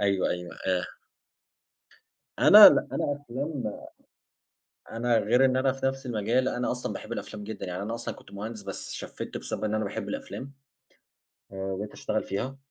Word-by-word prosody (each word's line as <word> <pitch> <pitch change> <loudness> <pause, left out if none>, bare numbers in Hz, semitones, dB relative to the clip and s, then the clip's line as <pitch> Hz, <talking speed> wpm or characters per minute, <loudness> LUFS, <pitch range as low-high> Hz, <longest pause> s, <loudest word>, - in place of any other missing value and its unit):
أيوه، 100 -2 +2
أيوه 90 0 -5
آآ 90 -1 +1 1.5
أنا 210 0 +11
لأ، - - +2
أنا - - -1 0.2
أفلام 140 0 -4 1.3
أنا 115 +1 +1
غير 120 +5 +4
إن 130 -1 +2
أنا 130 0 +3
في 135 0 -4
نَفْس 135 0 -2
مجالي، 120 +3 0
أنا 125 - 0
أصلًا 125 0 -3
باحب - - -8
الأفلام 105 -1 -6
جدًا، 110 -1 -6
يعني 90 +1 -4
أنا 115 - -3
أصلًا 120 - -5
كنت - - -16
مهندس، 110 +2 -6
بس 100 0 -6
شفّت، - - -6
بسبب - - -5
إن 110 0 0
أنا 110 - 0
باحب 105 +1 -4
الأفلام، 135 +6 -6 1.0
آآ، - - -8
وبقيت 95 +2 -4
اشتغل - - -2
فيها. 125 +8 -4
110 Hz, 165 wpm, -27 LUFS, 100-130 Hz, 1.5 s, أنا